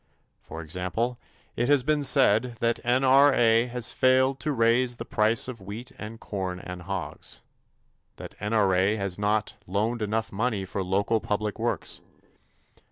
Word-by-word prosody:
For 80 0 -8
example, 90 +9 -3 0.4
it 120 +3 0
has 145 -3 +4
been 150 +2 +1
said 125 -4 +3
that 115 0 +1
N.R.A. 130 -2 +4
has 125 -1 -3
failed 130 +1 +3
to 155 - -1
raise 120 0 +2
the - - -6
price 110 +2 +1
of 120 -5 -7
wheat 110 +7 -8
and 110 +1 -8
corn 95 -4 -4
and 90 -1 -8
hogs; 95 0 -5 0.7
that - - -9
N.R.A. 100 -1 +2
has 100 -3 -3
not 105 +1 0
loaned 110 +5 -1
enough 110 +1 -1
money 105 -1 -1
for 95 +1 -3
local 100 +4 +1
public 105 0 -2
works. - - -2
110 Hz, 145 wpm, -26 LUFS, 100-125 Hz, 0.7 s, has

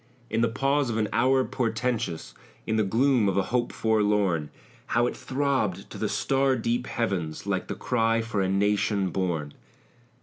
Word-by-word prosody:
In 115 - +1
the 115 - +4
pause 135 +3 +1
of 110 - -1
an 110 -1 +1
hour 130 +2 +3
portentous, 115 -7 -2 0.3
In 110 - 0
the 110 - +3
gloom 115 +1 +3
of 95 - -1
a 100 - +3
hope 120 -1 +1
forlorn, 105 -8 +1 0.4
How 120 +1 +2
it - - -2
throbbed 130 -8 -1
to - - -8
the - - -1
star 135 0 +1
deep 120 +1 -1
heavens, 90 -9 -2
Like - - -1
the - - -4
cry 115 -2 +1
for 110 -3 -2
a 95 - 0
nation 100 -1 +1
born! 80 -6 -2
110 Hz, 170 wpm, -26 LUFS, 100-125 Hz, 0.4 s, the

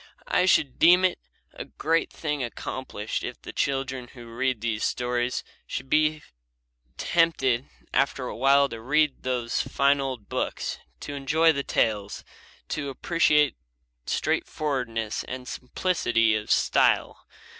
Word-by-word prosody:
I 180 - +3
should 140 -7 +3
deem 180 +3 +7
it 185 - 0 0.3
a - - -6
great 165 +1 0
thing 150 -4 -3
accomplished 120 -2 -5
if - - -5
the - - -9
children 135 -2 -1
who 120 -2 -12
read 130 -1 0
these 110 -2 -1
stories 125 0 -1 0.2
should - - -4
so - - -24
be 155 +1 +2 0.7
tempted 140 -7 +1 0.2
after 135 -1 +1
a - - -5
while 140 +3 +4
to 115 -1 -7
read 150 +4 +1
those 125 -2 -1
fine 140 0 +2
old 130 -6 -4
books, - - -3 0.2
to 145 - -6
enjoy 150 +4 +3
the 140 -3 -1
tales, 105 -6 -1 0.5
to 145 -2 -3
appreciate 150 0 +2 0.5
straightforwardness 125 -7 -1
and 125 0 -7
simplicity 125 -6 +1
of 105 0 -4
style. - - +2
135 Hz, 135 wpm, -26 LUFS, 120-150 Hz, 0.7 s, deem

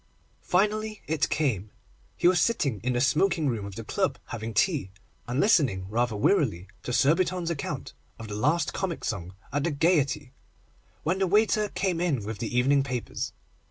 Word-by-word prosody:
Finally 215 +3 0
it 155 -1 0
came. 110 -10 0 0.5
He - - +3
was 175 -2 +4
sitting 140 - +1
in 125 +3 0
the 120 - +1
smoking 155 +3 +2
room 115 -6 -1
of 100 - -9
the 115 - -6
club - - -1
having 115 -1 -4
tea, 135 - +1 0.4
and 125 +3 -1
listening 130 - +3
rather 120 0 +1
wearily 105 - +2 0.2
to - - -5
Surbiton's 170 +6 +2
account 150 - -4 0.2
of 115 - -8
the 105 - -6
last 150 +11 +1
comic 190 -3 -3
song 90 -3 -4 0.2
at 145 0 0
the 170 - +1
Gaiety, 145 -3 +1 0.7
when 175 +4 0
the 190 - +2
waiter 210 +2 +3
came 185 -4 -1
in 140 - 0
with 110 -1 -5
the 120 +2 -2
evening 135 +3 +4
papers. 130 -3 -3
140 Hz, 170 wpm, -27 LUFS, 115-180 Hz, 0.7 s, was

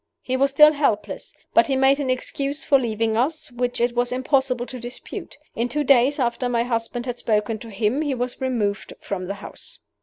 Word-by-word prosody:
He 255 - -1
was 275 +1 +3
still 300 +2 +7
helpless. 285 -8 -1 0.2
But - - +5
he 270 - +1
made 270 +1 +4
an 275 -3 -2
excuse 275 +3 -2
for 275 - +5
leaving 225 -2 -1
us 305 +5 -1
which 245 0 -2
it 240 +1 +1
was 245 0 +1
impossible 260 -1 +1
to 255 0 -7
dispute. 240 +1 -7 0.2
In 235 +2 -1
two 295 +4 0
days 270 +1 +4
after 245 -1 0
my 235 -1 +1
husband 240 0 -2
had 245 -1 -4
spoken 215 0 0
to 230 - -10
him 220 +6 0
he 290 -3 -1
was 250 +1 -3
removed 220 -6 -1
from 185 -2 -4
the 200 - -3
house. 200 - -8
245 Hz, 205 wpm, -23 LUFS, 230-270 Hz, 0.2 s, still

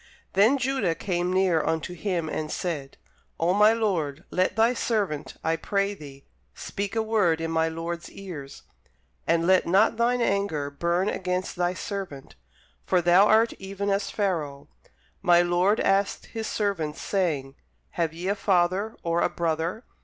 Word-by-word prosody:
Then 215 +9 +5
Judah 255 -10 0
came 180 -1 -1
near 185 -4 +2
unto 160 +2 -2
him, 175 -2 -2
and 155 0 -3
said, 150 -6 -4 0.4
Oh 170 +2 +2
my 210 +2 +6
lord, 175 -9 -1
let 185 0 +1
thy 225 +2 +4
servant, 195 - -2
I 160 - +1
pray 200 +4 -1
thee, 140 -6 -12 0.3
speak 200 +1 -5
a 225 - +1
word 205 -7 +2
in 165 0 -3
my 160 0 +1
lord's 170 +1 -5
ears, 160 -9 -9 0.6
and 165 0 +2
let 185 -1 +4
not 200 +6 +3
thine 240 +1 +2
anger 195 -10 0
burn 170 +6 0
against 185 -2 -2
thy 175 0 0
servant: 185 -10 -6 0.5
for 185 - +2
thou 175 +4 +5
art 220 +2 +4
even 200 +1 -3
as 195 0 0
Pharaoh. 165 -9 -2 0.5
My 175 0 +5
lord 180 +4 +2
asked 195 +1 +1
his 225 -1 -3
servants, 170 -8 -2
saying, 155 -9 -1 0.4
Have 165 -2 -1
ye 170 +3 -6
a 200 - +2
father, 195 +1 +1
or 170 0 +1
a - - +2
brother? 170 +6 -2
180 Hz, 155 wpm, -26 LUFS, 165-200 Hz, 0.6 s, my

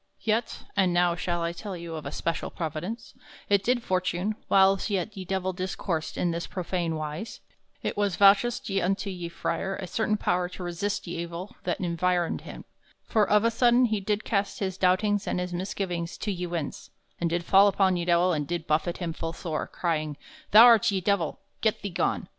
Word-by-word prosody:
Yet 225 +1 -1
(and 185 -3 +2
now 175 0 +4
shall 175 0 -2
I 170 - 0
tell 190 +2 -6
you 170 -1 -7
of 155 -3 -5
a - - -5
special 165 +2 -2
Providence) 170 +8 -5 0.4
it 200 -1 +3
did 240 +2 +1
fortune, 185 +1 0
whiles 195 +1 +4
yet 205 +1 -2
ye 190 -1 -6
Divell 190 0 -1
discoursed 180 -3 -3
in 175 - +1
this 170 +1 -3
profane 175 -2 -2
wise, 155 +7 -5 0.4
there - - -1
was 205 -3 0
vouchsafed 200 0 +4
unto 195 +3 -1
ye 175 -2 -5
frere 190 +3 -2
a 190 - -5
certain 215 +3 0
power 180 -3 0
to 185 - -8
resist 175 +4 -2
ye 170 -1 -4
evill 170 +3 -7
that 175 - -1
environed 175 0 0
him; - - -10 0.4
for 210 -3 +1
of 210 0 +4
a 230 - +3
sodaine 240 +1 +4
he 215 -1 0
did 205 +2 -1
cast 200 -2 -1
his 190 -2 -2
doubtings 195 +2 +2
and - - 0
his 180 0 -3
misgivings 180 -2 -3
to 210 - -2
ye 180 -2 -3
winds, 170 -4 -5 0.3
and 170 - 0
did 170 +1 -1
fall 195 +3 +6
upon 190 -2 +3
ye 175 - -1
Divell 175 +1 +3
and 150 -3 -2
did 170 -1 -3
buffet 160 +3 0
him 170 -3 -3
full 165 0 -4
sore, 160 -4 -3
crying, 155 -4 -2 0.3
"Thou 215 +3 +9
art 230 -3 +6
ye 195 -2 0
Divell! 185 -3 0 0.2
Get 220 -2 0
thee 200 - -3
gone!" 175 - -1
185 Hz, 200 wpm, -27 LUFS, 170-200 Hz, 0.4 s, Thou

